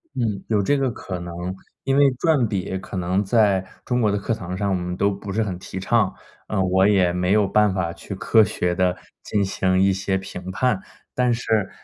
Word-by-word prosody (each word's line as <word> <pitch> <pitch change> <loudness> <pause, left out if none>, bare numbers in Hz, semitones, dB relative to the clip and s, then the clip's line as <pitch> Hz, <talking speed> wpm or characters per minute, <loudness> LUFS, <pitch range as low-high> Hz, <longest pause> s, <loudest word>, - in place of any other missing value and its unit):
嗯， 110 -6 -1
有 105 -2 +2
这 145 +8 +2
个 135 -1 +1
可 95 -5 -6
能， 85 0 -7 0.5
因 135 +1 +1
为 140 -1 +6
转 135 -2 +2
笔 95 -2 -2
可 95 - -9
能 90 +3 0
在 100 -3 +3 0.2
中 125 -1 0
国 105 -3 +3
的 105 - 0
课 105 +3 -1
堂 90 -3 -5
上， 100 0 -1
我 95 - +1
们 90 0 -3
都 100 0 +2
不 100 0 -6
是 110 +1 +1
很 95 -4 -4
提 95 - -7
倡， 100 0 +2 0.3
啊， 100 -3 0
我 95 +1 +3
也 95 -4 +3
没 90 +1 0
有 105 -2 +3
办 105 -2 +3
法 95 -3 -1
去 85 +4 -8
科 110 +2 +4
学 90 -3 -1
地 90 0 +1 0.3
进 100 -1 0
行 95 -1 +1
一 95 +1 +4
些 95 0 -1
评 95 -1 -7
判， 110 -1 0 0.3
但 125 -1 +2
是 110 -4 0
100 Hz, 235 characters per minute, -23 LUFS, 95-110 Hz, 0.5 s, 为